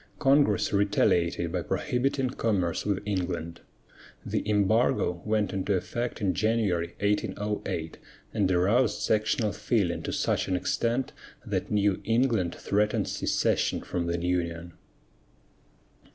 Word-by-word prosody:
Congress 135 -9 +3
retaliated 85 -4 +2
by 90 0 -1
prohibiting 135 - -1
commerce 100 -8 -1
with 100 -1 0
England. 90 -4 -3 0.6
The - - -1
embargo 105 -3 +2
went 105 -1 0
into 100 +1 0
effect 120 +6 -3
in 100 -4 +1
January, 100 -6 0
1808, 105 -5 -2 0.3
and 95 -2 +1
aroused 100 +8 +2
sectional 110 0 +1
feeling 105 -4 0
to - - -4
such - - 0
an 95 - 0
extent 120 +7 -1 0.3
that - - -2
New 100 -2 +1
England 115 -5 +1
threatened 105 +1 0
secession - - 0
from 85 -1 -3
the 85 0 -1
Union. 85 -1 -2
100 Hz, 115 wpm, -27 LUFS, 90-110 Hz, 0.6 s, Congress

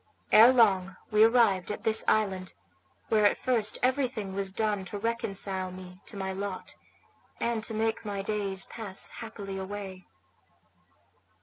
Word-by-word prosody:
Ere 230 +3 +9
long 195 -7 +3 0.2
we 215 0 +5
arrived 225 -5 +4
at - - -6
this 220 0 +3
island, 190 -4 0 0.6
where 215 -1 +3
at 205 - +4
first 230 -5 0
everything 250 -6 0
was 195 0 -1
done 210 -1 -1
to 205 - -6
reconcile 195 -4 -2
me 185 0 -11
to 205 - -10
my 190 -1 -3
lot, 195 -1 -5 0.7
and 235 -2 -1
to 225 - -3
make 225 +1 -1
my 200 -2 -4
days 200 -2 -2
pass 205 -5 -4
happily 200 -4 -6
away. 190 -1 -7
205 Hz, 140 wpm, -28 LUFS, 190-225 Hz, 0.7 s, Ere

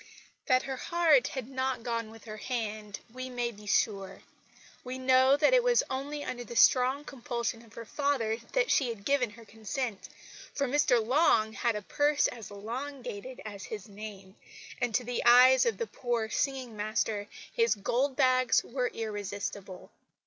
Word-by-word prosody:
That 255 0 +4
her 265 -1 -4
heart 320 -4 +3
had 260 -4 -5
not 260 -2 -2
gone 230 -2 -2
with 225 0 -14
her 215 -1 -7
hand 215 -3 -4
we 255 0 -6
may 245 -1 -2
be 210 -1 -14
sure. 195 -1 0 0.6
We 255 +1 -5
know 260 +1 +4
that 300 +11 +4
it - - +6
was 485 -1 +4
only 285 +3 -3
under 245 -3 -5
the 240 0 -9
strong 260 +4 +4
compulsion 235 -5 -4
of 220 -2 -19
her 230 - -7
father 255 -4 0 0.2
that - - +2
she 265 -4 +3
had 210 -4 -7
given 270 -3 +2
her 225 +2 -14
consent; 220 +1 -5 0.5
for 280 -1 0
Mr 250 -4 +3
Long 235 -5 +3
had 235 0 0
a 210 - -4
purse 290 +6 +2
as 225 -5 -8
elongated 250 +2 -6
as 205 -2 -7
his 210 -4 -7
name, 200 -2 -10 0.5
and 240 -2 0
to 250 - +2
the 245 0 -3
eyes 255 - +7
of 465 - 0
the 465 - -2
poor 240 - -2
singing 260 -4 -2
master 210 0 -1 0.3
his 460 -1 +3
gold 255 +7 0
bags 255 -2 +3
were 250 0 -2
irresistible. 205 -3 -6
245 Hz, 170 wpm, -30 LUFS, 215-265 Hz, 0.6 s, eyes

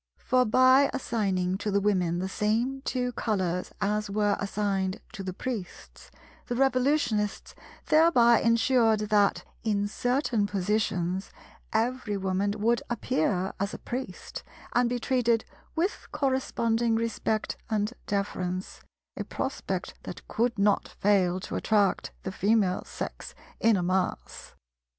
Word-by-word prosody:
For 255 0 +2
by 255 +4 +5
assigning 195 -7 -1
to 210 - -2
the 200 0 +2
Women 185 -4 +1
the 185 +2 -2
same 230 +7 0
two 250 -2 -1
colours 185 -7 -1
as 210 +1 0
were 205 0 +1
assigned 200 -1 -1
to - - -6
the 190 -1 -4
Priests, 210 -1 -7 0.4
the 245 - -2
Revolutionists 255 -5 +1 0.3
thereby 250 -8 +5
ensured 230 -1 +3
that, 205 -1 +3 0.2
in 205 -2 +1
certain 245 -1 0
positions, 190 -2 -1 0.4
every 225 -2 0
Woman 190 +1 0
would 230 +3 +2
appear 190 -4 0
as 200 +2 -2
a - - -6
Priest, 245 -7 -6 0.3
and 245 0 +3
be 245 - -1
treated 240 -2 +1 0.3
with 355 +6 -1
corresponding 235 -4 +1
respect 225 -1 -1
and 215 +1 0
deference—a 185 -2 -4
prospect - - -3
that - - -9
could 235 +1 0
not 200 0 +2
fail 190 -3 +3
to - - -5
attract 205 -3 +1
the 190 - -3
Female 200 -1 +1
Sex - - -7 0.2
in 225 -2 +4
a 180 - -1
mass. 185 +1 -2
210 Hz, 125 wpm, -28 LUFS, 195-240 Hz, 0.4 s, by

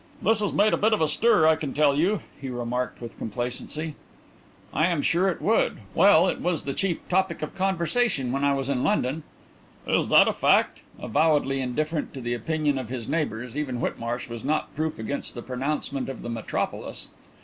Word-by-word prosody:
"This 220 +1 +2
has 205 -2 0
made 210 +1 +3
a - - +3
bit 215 +2 +3
of 215 - +1
a 160 - +4
stir, 195 -1 +3
I 160 0 +6
can 150 -4 -5
tell 145 -1 +4
you," 180 +7 +1 0.2
he 135 - -5
remarked, 125 0 -3
with 120 -2 -9
complacency. 125 +7 -3 0.8
"I 155 +4 +3
am 170 -5 0
sure 185 +3 +3
it 175 - -4
would. 225 +2 +2 0.2
Well, 190 -3 +6
it - - -2
was 175 -3 0
the 140 - -3
chief 185 0 -2
topic 185 -3 0
of 155 - -5
conversation 190 - 0
when 135 +2 -1
I 140 0 +3
was 135 -1 -2
in 135 -3 0
London." 160 -7 +1 0.6
"Is - - +1
that - - +6
a - - +2
fact?" - - +2 0.2
Avowedly 145 -4 +2
indifferent 150 +5 -2
to 135 - -6
the 120 0 -2
opinion 145 +3 0
of 125 -4 -6
his 125 -3 -5
neighbours, 125 -6 -2
even 145 -5 -2
Whitmarsh 120 0 -3
was 115 -1 -7
not 155 +3 -1
proof 155 +1 -2
against 110 +7 -4
the 120 - -6
pronouncement 135 +1 -3
of 135 - -7
the 120 - -5
metropolis. 115 -2 -3
145 Hz, 195 wpm, -25 LUFS, 125-170 Hz, 0.8 s, I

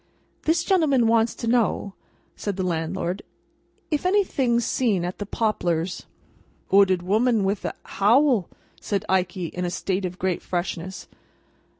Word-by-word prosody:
"This 330 +1 +2
gentleman 310 -10 +3
wants 225 0 +3
to 235 - -5
know," 225 -4 +1 0.4
said 205 -2 -3
the 190 - -1
landlord, 175 +2 -2 0.7
"if 300 - 0
anything's 280 - +2
seen 205 -9 +1
at 180 - -5
the 205 - -4
Poplars." 180 -6 -1 0.7
"'Ooded 190 -3 +5
woman 220 +3 +2
with 195 +1 -1
a - - -3
howl," 230 - +3 0.3
said 200 0 -2
Ikey, 180 -2 0
in 180 - -3
a 175 - 0
state 185 +1 -2
of 180 0 -5
great 185 -2 -1
freshness. 180 +1 -4
200 Hz, 135 wpm, -24 LUFS, 180-235 Hz, 0.7 s, Ooded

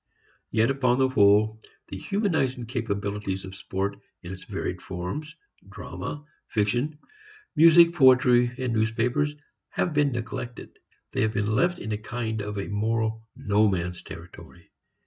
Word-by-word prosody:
Yet 110 +3 +2
upon 125 -2 +2
the 130 0 +3
whole 110 -1 +4 0.3
the - - -6
humanizing 160 - 0
capabilities 100 -5 -3
of 95 0 -9
sport 100 +1 -3 0.2
in 90 +2 -6
its 95 - -11
varied - - -4
forms, 90 - -5 0.3
drama, 145 0 -7 0.2
fiction, 120 +8 0 0.6
music, 170 +2 +7
poetry, 130 -4 +5
newspapers 120 +4 0 0.3
have 175 - -1
been 145 -1 +3
neglected. 120 0 -6 0.3
They - - -1
have 110 +1 +1
been 105 0 0
left 175 +7 +2
in 110 - -6
a 105 - -2
kind 110 -1 -3
of 105 0 -5
a 100 - -3
moral 110 +1 -1
no 105 -4 +2
man's 90 -2 -2
territory. - - -12
115 Hz, 135 wpm, -26 LUFS, 105-130 Hz, 0.6 s, music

